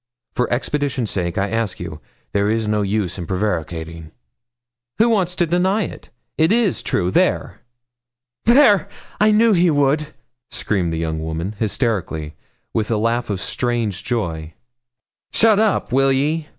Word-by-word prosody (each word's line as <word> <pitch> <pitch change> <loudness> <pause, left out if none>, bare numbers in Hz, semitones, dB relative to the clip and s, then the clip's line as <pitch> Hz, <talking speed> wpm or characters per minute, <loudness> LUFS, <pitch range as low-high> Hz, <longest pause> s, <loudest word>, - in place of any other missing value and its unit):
For 125 - -1
expedition's 135 -1 -1
sake 85 -3 -2
I 100 +1 0
ask 115 -3 -1
you. - - -7 0.3
There 100 0 +2
is 110 0 0
no 105 0 +1
use 100 -2 -1
in 85 - -5
prevaricating.' 85 -4 -3 0.9
'Who 230 +2 +4
wants 185 -5 +1
to 175 - +2
deny 185 +5 +1
it? - - -8 0.3
It 160 +3 +4
is 225 -5 +2
true 90 -1 0
there!' - - +1 0.8
'There! 235 - +5 0.3
I 210 - +5
knew 220 +1 +5
he 175 -1 +4
would,' 145 0 +2 0.4
screamed 90 -5 -1
the 80 - -2
young 80 -1 -2
woman, 80 +4 -3
hysterically, 100 - -1 0.4
with 110 -1 -1
a 115 - +1
laugh 115 +2 0
of 100 -3 -2
strange 110 -2 -2
joy. 85 -10 -3 0.8
'Shut 220 -2 +4
up, 215 - +1
will 135 +1 +4
ye?' 150 +4 0
115 Hz, 150 wpm, -20 LUFS, -, 0.9 s, There